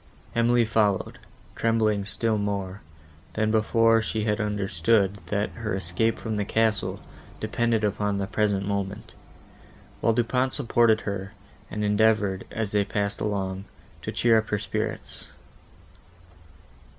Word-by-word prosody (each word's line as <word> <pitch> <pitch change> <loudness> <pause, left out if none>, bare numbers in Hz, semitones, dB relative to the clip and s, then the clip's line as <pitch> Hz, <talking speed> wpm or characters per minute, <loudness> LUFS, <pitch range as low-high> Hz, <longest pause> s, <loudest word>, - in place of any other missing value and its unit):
Emily 120 0 +3
followed, 105 -3 +1 0.4
trembling 110 -3 +1
still 110 +1 0
more, 100 -1 -3 0.5
than 110 0 +1
before 115 +1 +4
she 110 0 -2
had 105 0 0
understood, 100 0 +1
that 105 0 -1
her 110 -4 -3
escape 95 +5 0
from 110 -1 -3
the 105 - +1
castle, 110 0 0 0.4
depended 115 -2 0
upon 105 0 0
the 100 - -1
present 100 -1 0
moment; 100 +2 -3 0.9
while 115 - +3
Du 120 +1 +2
Pont 125 +2 0
supported 115 -4 +3
her, 100 -1 -4 0.4
and 105 - -3
endeavoured, 105 -2 +2
as 110 -2 -3
they 105 -1 +3
passed 100 0 -2
along, 95 -2 -2 0.4
to - - -4
cheer 115 -2 +4
her 105 -1 -2
spirits. 105 +2 -4
105 Hz, 125 wpm, -26 LUFS, 100-110 Hz, 0.9 s, before